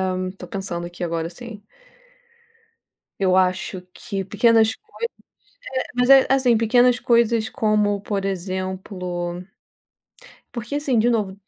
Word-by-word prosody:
Eh, 185 Hz, 0 st, -3 dB
tô -, -, -8 dB
pensando 190 Hz, -4 st, -4 dB
aqui 175 Hz, +1 st, -9 dB
agora 165 Hz, -1 st, -2 dB
sim. 210 Hz, +2 st, -10 dB, 1.6 s
Eu 185 Hz, -2 st, +3 dB
acho 185 Hz, 0 st, +1 dB
que 200 Hz, -4 st, -5 dB
pequenas 225 Hz, +3 st, +3 dB
coisas 430 Hz, -, -37 dB, 1.0 s
É, -, -, -14 dB
mas 250 Hz, +1 st, +2 dB
é, 270 Hz, -1 st, +8 dB
assim, 260 Hz, -4 st, +4 dB
pequenas 245 Hz, +2 st, +4 dB
coisas 235 Hz, -2 st, +2 dB
como 210 Hz, -4 st, +1 dB
por 200 Hz, -2 st, -3 dB
exemplo 185 Hz, -2 st, -4 dB, 1.1 s
porque 240 Hz, +3 st, -5 dB
assim, 275 Hz, -5 st, +1 dB
de 240 Hz, +2 st, +3 dB
novo, 200 Hz, -4 st, -1 dB
205 Hz, 125 wpm, -22 LUFS, 185-235 Hz, 1.6 s, é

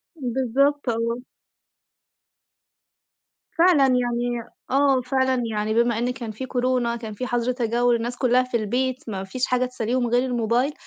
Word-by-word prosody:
بالضبط، 265 Hz, +1 st, 0 dB
آه. 230 Hz, +2 st, -1 dB, 2.3 s
فعلًا. 330 Hz, -6 st, +4 dB
يعني 245 Hz, -1 st, 0 dB, 0.3 s
آه، 270 Hz, -1 st, +3 dB
فعلًا 260 Hz, 0 st, 0 dB
يعني 215 Hz, 0 st, -1 dB
بما 235 Hz, 0 st, +2 dB
إن 240 Hz, +2 st, 0 dB
كان 235 Hz, -3 st, -6 dB
في 260 Hz, +5 st, -6 dB
كورونا، 250 Hz, -2 st, 0 dB
كان 225 Hz, -2 st, -7 dB
في 250 Hz, +5 st, -4 dB
حَظْر 245 Hz, 0 st, 0 dB
تجوّل، 240 Hz, 0 st, +1 dB
الناس 240 Hz, +2 st, -3 dB
كُلّها 255 Hz, 0 st, +3 dB
في 250 Hz, -2 st, -1 dB
البيت، 250 Hz, +4 st, -1 dB
ما 195 Hz, -2 st, -4 dB
فيش 245 Hz, +7 st, -2 dB
حاجة 255 Hz, 0 st, +1 dB
تسلّيهم 245 Hz, 0 st, -1 dB
غير 245 Hz, +2 st, +2 dB
الموبايل، 245 Hz, +3 st, 0 dB
245 Hz, 145 wpm, -23 LUFS, 235-255 Hz, 2.3 s, فعلًا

